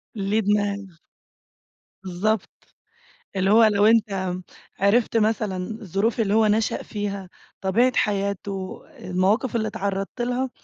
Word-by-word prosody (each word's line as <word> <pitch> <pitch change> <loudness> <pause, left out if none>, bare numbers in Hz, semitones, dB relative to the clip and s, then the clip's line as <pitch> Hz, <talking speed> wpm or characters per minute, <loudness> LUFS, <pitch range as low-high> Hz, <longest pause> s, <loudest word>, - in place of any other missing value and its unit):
ليه 205 +2 0
دماغ. 205 -3 -1 1.1
بالضبط، 190 +3 -1 0.9
اللي 190 +1 +2
هو 225 +1 +7
لو 210 -1 +4
أنتَ 195 -5 +2 0.4
عرِفت 225 +3 +3
مثلًا 215 -3 +1 0.2
الظروف 210 +5 -1
اللي 205 -2 +1
هو 220 0 +4
نشَأ 215 +1 +1
فيها، 200 -3 -5 0.3
طبيعة 230 +7 +3
حياته، 200 -2 -2 0.2
المواقِف 195 +8 0
اللي 220 -1 0
اتعرَّضت 195 +3 -3
لها، 250 +2 -1
205 Hz, 115 wpm, -24 LUFS, 195-220 Hz, 1.1 s, هو